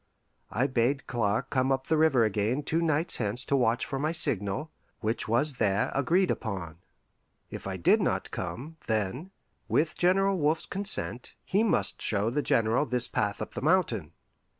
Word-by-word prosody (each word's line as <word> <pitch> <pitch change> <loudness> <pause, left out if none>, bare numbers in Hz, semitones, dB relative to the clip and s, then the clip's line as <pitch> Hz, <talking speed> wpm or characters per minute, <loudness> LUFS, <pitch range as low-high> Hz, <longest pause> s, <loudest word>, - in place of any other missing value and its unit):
I 130 - 0
bade 130 +1 0
Clark 105 -4 -1
come 130 0 +1
up 135 0 0
the 160 - +1
river 155 -6 +4
again 110 +7 -1
two 165 +3 0
nights 160 0 +2
hence 115 +3 -2
to 140 - +1
watch 120 -2 +1
for 135 - -4
my 155 +3 0
signal, 110 - +1 0.3
which 110 +1 -2
was 125 +5 +2
there 100 -2 +1
agreed 170 +8 +2
upon. 85 -7 -5 0.7
If - - -7
I 95 -1 -4
did 85 - +3
not - - -1
come, 120 - -6
then, 110 - -2 0.4
with 155 +1 +1
General 195 +1 +2
Wolfe's 155 +2 +1
consent, 195 - 0
he 200 +3 +1
must 225 - +1
show 105 +2 0
the 145 +4 0
General 115 +3 +1
this 125 -1 +1
path 100 -1 -2
up - - -10
the 120 - -5
mountain. 135 - +1
130 Hz, 170 wpm, -28 LUFS, 110-155 Hz, 0.7 s, river